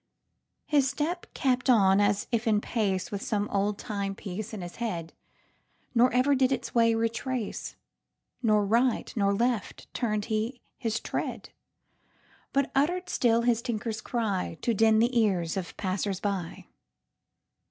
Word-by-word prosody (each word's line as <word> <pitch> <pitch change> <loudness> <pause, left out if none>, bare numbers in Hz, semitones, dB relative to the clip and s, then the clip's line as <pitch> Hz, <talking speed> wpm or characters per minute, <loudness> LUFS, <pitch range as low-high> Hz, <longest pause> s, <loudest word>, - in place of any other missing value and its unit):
His 280 -3 +3
step 310 +6 -3
kept 255 -1 +1
on 195 -5 +5
as 205 0 +2
if 230 0 0
in 215 -2 +4
paceWith 205 -1 -1
some 210 -2 -1
old 200 +1 0
timepiece 200 -1 -4
in 215 -4 -6
his 175 0 -8
head, 170 -9 -3 0.8
Nor 250 +1 +5
ever 255 +4 +3
did 260 -1 +3
its 265 - -2
way 230 -1 +4
retrace; 230 +1 -2 0.7
Nor 215 -4 +3
right 235 +4 +1
nor 200 -3 +2
left 235 +1 -1
turn'd 215 -4 -1
he 225 +3 -2 0.2
his 225 -2 -2
tread, - - -4 1.0
But 275 0 +1
utter'd 350 +7 +1
still 235 -1 +2
his 235 -1 +2
tinker's 220 -2 -3
cryTo 220 -2 -1
din 220 +1 +5
the 240 +3 +2
ears 180 -7 +1
of 185 -3 -5
passersby. 190 -1 -2
220 Hz, 130 wpm, -28 LUFS, 200-245 Hz, 1.0 s, on